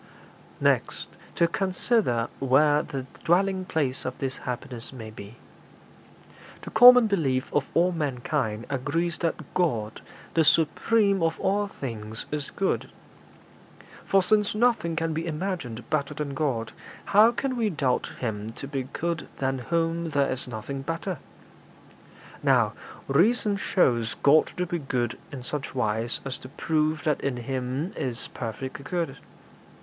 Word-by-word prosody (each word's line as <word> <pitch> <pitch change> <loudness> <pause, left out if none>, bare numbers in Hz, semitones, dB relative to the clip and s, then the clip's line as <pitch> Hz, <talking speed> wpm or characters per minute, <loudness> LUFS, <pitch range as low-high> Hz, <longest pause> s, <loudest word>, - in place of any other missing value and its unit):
'Next - - +1 0.3
to 170 - +4
consider 185 - +1
where 145 +3 +4
the 135 -3 -5 0.2
dwelling 185 +2 +2
place 140 -7 -1
of - - -4
this 130 -1 -3
happiness 125 -1 -5
may 115 -4 -8
be. 105 +1 -10 1.3
The - - -7
common 245 +1 +9
belief 140 -11 0
of 145 -2 +1
all 175 +2 +4
mankind 130 -7 -2
agrees 150 +5 -1
that 165 -2 -3
God, 115 -12 0 0.3
the 165 - +4
supreme 195 +6 +3
of 165 0 0
all 205 +1 +1
things, 110 - -6
is 150 -2 -3
good. 195 -1 -1 1.1
For 195 -1 +3
since 210 +1 +2
nothing 220 -8 +2
can 165 0 -1
be 165 +2 -3
imagined 155 - -4
better 145 -2 0
than 145 -2 -3
God, 130 -6 -1 0.3
how 210 +3 +6
can 255 +2 -2
we 230 -3 +1
doubt 140 -8 0
Him 110 -2 -3
to 140 - -8
be 135 -2 -3
good 170 -1 -2
than 135 -1 -1
whom 165 +3 -1
there 140 -2 +1
is 130 0 -4
nothing 125 +4 -5
better? 165 +3 -3 1.2
Now, - - +3 0.3
reason 205 - +3
shows 120 - +1
God 150 +2 +5
to 180 - 0
be 175 0 -2
good 125 -4 -2
in 135 -4 -7
such 140 +1 -5
wise 115 -1 -1
as 135 -1 -4
to 130 - -11
prove 155 0 0
that 150 -3 +1
in 135 -3 -1
Him 130 +6 -3
is 125 -1 -3
perfect 130 +4 -6
good. 165 -2 -2
150 Hz, 140 wpm, -26 LUFS, 130-175 Hz, 1.3 s, common